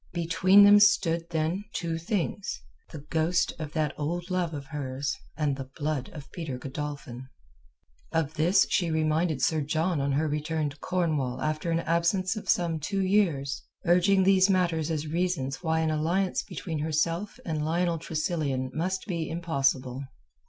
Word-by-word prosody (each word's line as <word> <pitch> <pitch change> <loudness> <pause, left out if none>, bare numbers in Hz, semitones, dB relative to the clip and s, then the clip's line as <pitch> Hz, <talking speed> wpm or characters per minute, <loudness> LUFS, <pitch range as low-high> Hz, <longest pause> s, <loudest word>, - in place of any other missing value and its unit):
Between 185 +4 +5
them 205 0 +8
stood, 170 -6 +3
then, 165 +4 -1
two 165 -1 -2
things; 190 - -3 0.3
the 150 - -8
ghost 165 +2 +1
of 155 -1 -6
that 155 -3 0
old 175 +4 -3
love 180 -2 0
of 145 -3 -6
hers 140 -1 -3 0.2
and 150 -3 +1
the 135 -1 -7
blood 150 -4 -2
of 145 -3 -11
Peter 160 -7 -5
Godolphin. 135 -2 -6 0.8
Of 160 -2 0
this 175 +5 +4
she 175 -2 +2
reminded 160 -1 +1
Sir 160 -1 +2
John 160 +2 0
on 140 0 0
her 155 +3 +1
return 150 0 -1
to 145 - -14
Cornwall 150 -8 -1
after 155 +2 -2
an 165 0 +1
absence 170 +5 +1
of 215 - -7
some 170 -2 +2
two 195 +6 -1
years, 170 -9 +1 0.2
urging 185 +3 +4
these 190 0 +5
matters 170 -4 +1
as 155 -2 -2
reasons 160 -4 -1
why 160 -2 +1
an 160 -1 +1
alliance 175 +5 0
between 160 -4 -5
herself 165 +6 -1
and 155 -3 -2
Lionel 170 +1 0
Tressilian 155 -5 -2
must 185 +4 -2
be 170 -6 -3
impossible. 135 -6 0
160 Hz, 160 wpm, -28 LUFS, 150-175 Hz, 0.8 s, them